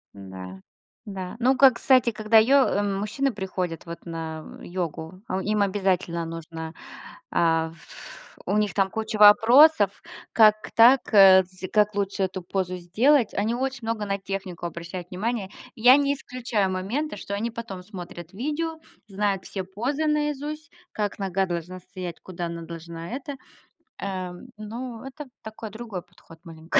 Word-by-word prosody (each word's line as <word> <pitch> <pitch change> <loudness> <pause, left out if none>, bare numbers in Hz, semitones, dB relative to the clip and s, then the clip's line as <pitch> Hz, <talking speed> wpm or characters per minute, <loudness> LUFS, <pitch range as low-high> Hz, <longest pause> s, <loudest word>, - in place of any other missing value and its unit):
Н-да. 95 -1 -9 0.5
Да. 190 -3 -6
Ну 255 +2 +3
как, 265 -2 +7
кстати, 255 -1 +4
когда 215 +1 +3
йо 270 +5 +6
э, 205 - 0
мужчины 210 +7 -1
приходят 185 -4 -4
вот 170 +1 -8
на 160 -2 -7
йогу, 175 0 -5
а 190 +1 -2
им 210 +1 0
обязательно 185 -4 0
нужно, 165 0 -7 0.6
а, 165 -1 +2
ф 170 - -14
У 205 - 0
них 210 -3 +1
там 195 -1 +2
куча 220 -1 -3
вопросов. 215 - +6 0.3
Как 215 -1 +5
так, 240 +3 +6
э, 190 -2 +8
кстати 185 +1 -10
как 210 -1 +3
лучше 200 -1 -1
эту 185 -1 -3
позу 185 0 -2
сделать? 225 +8 +2
Они 220 +4 0
очень 265 0 -2
много 225 -2 -2
на 200 0 -2
технику 195 -3 -5
обращают 170 +1 -7
внимание. 205 +1 -2 0.3
Я 250 +4 +7
не 280 0 +2
исключаю 240 -7 -2
моменты, 210 +11 -2
что 200 - -6
они 230 +3 -2
потом 225 -5 -7
смотрят 175 -3 -9
видео, 305 +8 -3 0.3
знают 200 -1 -1
все 190 - -4
позы 245 +12 -2
наизусть, 300 +1 -2 0.2
как 205 -2 -3
нога 195 -1 0
должна 175 +1 -5
стоять, 180 -2 -8
куда 175 -2 -6
она 170 0 -6
должна 165 0 -8
это. 275 +1 -6 0.6
Эм, 185 +3 -5
ну, 230 +2 -7
это 280 +2 -8 0.2
такой 220 0 -8
другой 220 -3 -7
подход 165 -1 -18
маленько. 165 0 -1
200 Hz, 150 wpm, -25 LUFS, 180-235 Hz, 0.6 s, э